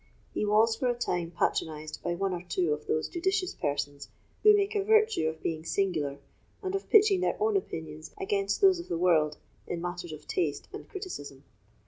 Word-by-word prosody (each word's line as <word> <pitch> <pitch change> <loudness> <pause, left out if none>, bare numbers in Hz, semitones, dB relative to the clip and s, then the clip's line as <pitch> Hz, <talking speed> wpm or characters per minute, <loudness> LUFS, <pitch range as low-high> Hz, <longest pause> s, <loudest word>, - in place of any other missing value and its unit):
He - - 0
was 220 +2 +4
for 255 - -1
a 245 - +1
time 175 -8 -1
patronised 155 -2 -2
by 175 0 -1
one 195 +1 -1
or 175 - -3
two 175 -2 0
of 150 0 -6
those 155 - 0
judicious 370 +1 -1
persons 145 -1 -3 0.3
who 425 -1 +8
make 400 +1 0
a 410 -2 +1
virtue 435 - +3
of 160 0 -9
being 160 -1 -2
singular, 160 -7 -1 0.5
and 375 0 -2
of 390 - -3
pitching 415 -3 +6
their - - 0
own 430 0 +2
opinions 160 - -4
against 200 0 0
those 380 -3 +6
of 340 - -7
the 170 - -1
world 160 -4 +3 0.3
in 175 - -3
matters 175 0 -5
of 155 - -10
taste 365 - -1
and - - -8
criticism. 145 - -7
180 Hz, 190 wpm, -29 LUFS, -, 0.5 s, who